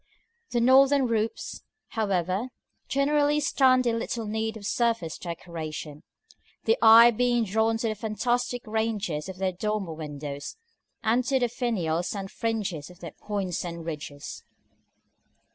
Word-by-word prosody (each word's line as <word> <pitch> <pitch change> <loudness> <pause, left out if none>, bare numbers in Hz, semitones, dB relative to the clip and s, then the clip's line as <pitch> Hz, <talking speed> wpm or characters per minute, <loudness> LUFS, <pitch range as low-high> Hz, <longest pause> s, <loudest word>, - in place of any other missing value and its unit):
The 240 - 0
northern 270 +2 +5
roofs, 225 -2 -2 0.3
however, 195 0 0 0.4
generally 290 +2 +2
stand 255 -3 +3
in 230 -1 +1
little 230 0 -3
need 220 +1 -2
of 205 - -10
surface 230 -8 0
decoration, 160 -3 -6 0.6
the 455 - +3
eye 230 +2 +9
being 240 +1 +2
drawn 220 +2 +1
to 225 0 -1
the - - 0
fantastic 240 +3 -1
ranges 215 -7 -2
of 190 - -7
their 190 0 0
dormer 195 -2 -2
windows, 145 -2 -6 0.5
and 230 +3 +2
to 270 +1 +2
the 245 -2 +1
finials 180 -9 -1
and 195 -1 -5
fringes 205 -10 -3
on 180 - -13
their 170 -3 -7
points 195 -4 -3
and 170 -2 -6
ridges. 150 -3 -7
220 Hz, 135 wpm, -27 LUFS, 175-240 Hz, 0.6 s, eye